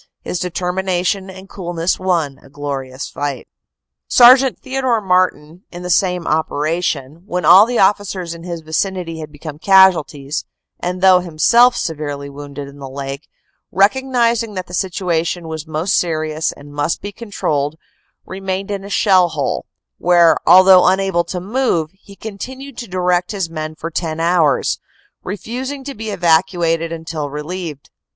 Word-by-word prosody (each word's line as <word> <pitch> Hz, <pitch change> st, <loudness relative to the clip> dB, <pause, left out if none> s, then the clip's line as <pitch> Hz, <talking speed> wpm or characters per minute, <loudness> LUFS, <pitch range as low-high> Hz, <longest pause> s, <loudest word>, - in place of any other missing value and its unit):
His 180 Hz, -, -3 dB
determination 180 Hz, +2 st, -1 dB
and 190 Hz, +1 st, -11 dB
coolness 175 Hz, -3 st, -2 dB
won 170 Hz, -7 st, -1 dB
a 140 Hz, -, -18 dB
glorious 135 Hz, -2 st, -5 dB
fight. 145 Hz, -2 st, -4 dB, 0.6 s
Sergt. 255 Hz, +1 st, +6 dB
Theodore 260 Hz, -3 st, -1 dB
Martin, 180 Hz, -4 st, 0 dB
in 175 Hz, 0 st, -8 dB
the 180 Hz, -, -3 dB
same 180 Hz, -1 st, +1 dB
operation, 155 Hz, -1 st, -1 dB
when 180 Hz, -2 st, -2 dB
all 195 Hz, +7 st, +8 dB
the 245 Hz, 0 st, -1 dB
officers 190 Hz, -3 st, +1 dB
in 170 Hz, -, -10 dB
his 170 Hz, -1 st, -6 dB
vicinity 165 Hz, +1 st, -3 dB
had 155 Hz, -1 st, -8 dB
become 150 Hz, 0 st, -9 dB
casualties, 165 Hz, -7 st, +3 dB, 0.4 s
and 180 Hz, +1 st, -3 dB
though 185 Hz, -1 st, +6 dB
himself 230 Hz, +9 st, +4 dB
severely 145 Hz, -3 st, -4 dB
wounded 145 Hz, 0 st, -8 dB
in 140 Hz, +1 st, -13 dB
the 135 Hz, -1 st, -7 dB
leg, 135 Hz, +1 st, -6 dB, 0.4 s
recognizing 230 Hz, +1 st, +1 dB
that 185 Hz, -1 st, -4 dB
the 180 Hz, -, -13 dB
situ 185 Hz, -1 st, -2 dB
ation 170 Hz, +1 st, -1 dB
was 160 Hz, -1 st, -6 dB
most 160 Hz, +5 st, -1 dB
serious 155 Hz, -2 st, -1 dB
and 145 Hz, 0 st, -14 dB
must 145 Hz, +3 st, -2 dB
be 205 Hz, -, -5 dB
controlled, 155 Hz, -10 st, -2 dB, 0.5 s
remained 195 Hz, +1 st, -4 dB
in 200 Hz, -1 st, -4 dB
a 200 Hz, -, -9 dB
shell 190 Hz, -4 st, +4 dB
hole, 145 Hz, -3 st, -3 dB, 0.3 s
where, 175 Hz, -2 st, +5 dB
although 185 Hz, +1 st, +7 dB
unable 190 Hz, -2 st, +2 dB
to 180 Hz, +2 st, -4 dB
move, 190 Hz, -6 st, -1 dB
he 200 Hz, +1 st, -17 dB
continued 255 Hz, +7 st, -8 dB
to 240 Hz, -, -6 dB
direct 180 Hz, 0 st, 0 dB
his 190 Hz, -5 st, -3 dB
men 155 Hz, -1 st, -5 dB
for 165 Hz, +1 st, -6 dB
10 160 Hz, -1 st, -3 dB
hours, 165 Hz, -3 st, +2 dB, 0.4 s
refusing 250 Hz, +8 st, -5 dB
to 280 Hz, +1 st, -6 dB
be 220 Hz, -1 st, -6 dB
evacuated 170 Hz, -2 st, +1 dB
until 160 Hz, -3 st, -5 dB
relieved. 150 Hz, 0 st, -6 dB
175 Hz, 150 wpm, -18 LUFS, 155-195 Hz, 0.6 s, all